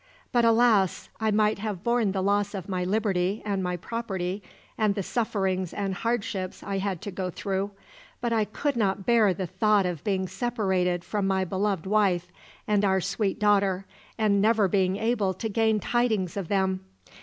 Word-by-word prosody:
But, 240 -2 +3
alas! 225 -5 +3
I 220 -1 +1
might 215 0 +2
have 205 -3 -4
borne 235 -4 +2
the 190 -1 -1
loss 205 +1 +1
of 190 -2 -5
my 185 -2 -1
liberty, 195 0 0
and 200 -2 -1
my 180 -1 -2
property, 195 -2 -3 0.3
and 210 -2 +1
the 200 - -2
sufferings 190 -5 -1
and 195 -1 -1
hardships 210 -3 -2
I 195 -1 -2
had 190 -3 -3
to 205 - -4
go 185 0 -3
through, 195 +2 -2 0.5
but 235 -1 -1
I 220 -2 +2
could 280 +7 -2
not 195 -4 0
bear 230 -4 +4
the 185 +1 -3
thought 210 +2 +2
of 175 -5 -3
being 190 -2 0
separated 190 -4 0
from 205 -2 -1
my 190 -1 +1
beloved 195 -1 -1
wife 190 -4 +1 0.4
and 210 -1 +2
our 190 -1 +3
sweet 195 +2 -1
daughter, 200 -2 +2 0.3
and 205 -3 +3
never 215 -1 +4
being 190 0 +1
able 215 -4 0
to 225 - -3
gain 220 0 +2
tidings 215 -5 0
of 195 -4 -3
them. 190 -1 +1
200 Hz, 180 wpm, -26 LUFS, 190-215 Hz, 0.5 s, bear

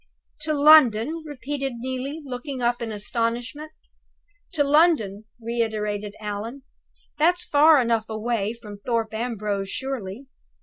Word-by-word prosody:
"To 310 - 0
London?" 295 -1 +6
repeated 275 -1 -4
Neelie, 260 +5 -4
looking 260 +1 -5
up 240 0 0
in 230 -1 -3
astonishment. 235 +8 -3 0.8
"To 300 -3 +3
London!" 280 - +3
reiterated 215 -3 -2
Allan. 215 +5 -5 0.6
"That's 355 +3 +3
far 300 +1 +6
enough 230 -3 0
away 220 -1 -1
from 210 -4 -11
Thorpe 225 0 -1
Ambrose, 210 -4 -2
surely? 260 -3 -5
240 Hz, 115 wpm, -24 LUFS, 215-285 Hz, 0.8 s, London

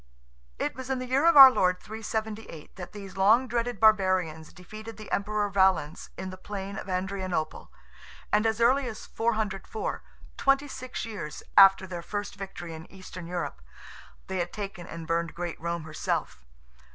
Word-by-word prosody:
It - - -1
was 260 +1 -8
in 265 - 0
the 255 - -4
year 265 +5 +2
of 335 -3 +6
our 270 -1 +13
Lord 180 -6 +2
378 220 -5 -6
that 180 -2 -8
these 195 -2 -10
long 220 +7 +5
dreaded 240 0 -2
barbarians 185 -7 +3
defeated 215 +5 -10
the 215 - -10
Emperor 210 +1 0
Valens 190 -6 +2
in 190 - -5
the 185 - -9
plain 200 -1 -6
of 195 - -7
Adrianople, 185 -3 -3 0.6
and 210 +2 +4
as 220 +1 0
early 255 +3 +4
as 220 -2 -7
404—twenty 225 +5 -1
six 255 -3 -6
years 190 -10 -6
after 195 -1 +8
their 180 -2 -6
first 205 +3 -4
victory 190 -4 -7
in 160 0 -10
Eastern 185 -2 -9
Europe—they 170 - -7
had 175 0 -2
taken 195 -4 -6
and 165 -1 -7
burned 165 0 -1
great 175 -2 -5
Rome 170 0 -2
herself. 155 - -3
195 Hz, 155 wpm, -28 LUFS, 175-220 Hz, 0.6 s, our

